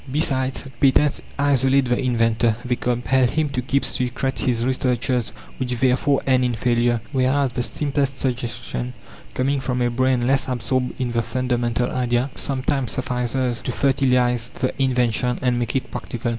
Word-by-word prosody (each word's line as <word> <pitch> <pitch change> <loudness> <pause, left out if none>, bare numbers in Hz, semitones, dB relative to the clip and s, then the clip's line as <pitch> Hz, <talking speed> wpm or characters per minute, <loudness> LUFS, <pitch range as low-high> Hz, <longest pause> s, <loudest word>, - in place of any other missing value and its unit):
Besides, 135 -2 0
patents 140 +1 +3 0.2
isolate 135 -1 +3
the 125 0 +1
inventor. 115 -3 +2
They 125 0 +1
compel 125 +2 +1
him 155 +4 0
to 130 -2 -2
keep 135 +2 0
secret 130 +1 -2
his 120 -2 0
researches 125 -2 0 0.3
which 125 -2 -1
therefore 135 +2 +2
end 130 -1 +3
in 125 -1 0
failure; 120 0 +1
whereas 135 0 +2
the 125 - -2
simplest 140 +1 -1
suggestion, 120 - -3 0.4
coming 135 +2 +1
from 125 -1 -2
a 120 -1 +1
brain 130 0 +1
less 135 +1 +2
absorbed 125 +1 -2
in 125 -2 -1
the 115 -1 +1
fundamental 120 0 -1
idea, 125 +1 0
sometimes 135 -1 -2
suffices 125 -2 -1
to - - -3
fertilize 125 -3 +2
the 130 - -1
invention 125 -2 +1
and 125 -1 +2
make 120 +1 -2
it 135 - -2
practical. 120 0 -4
125 Hz, 155 wpm, -22 LUFS, 120-135 Hz, 0.4 s, patents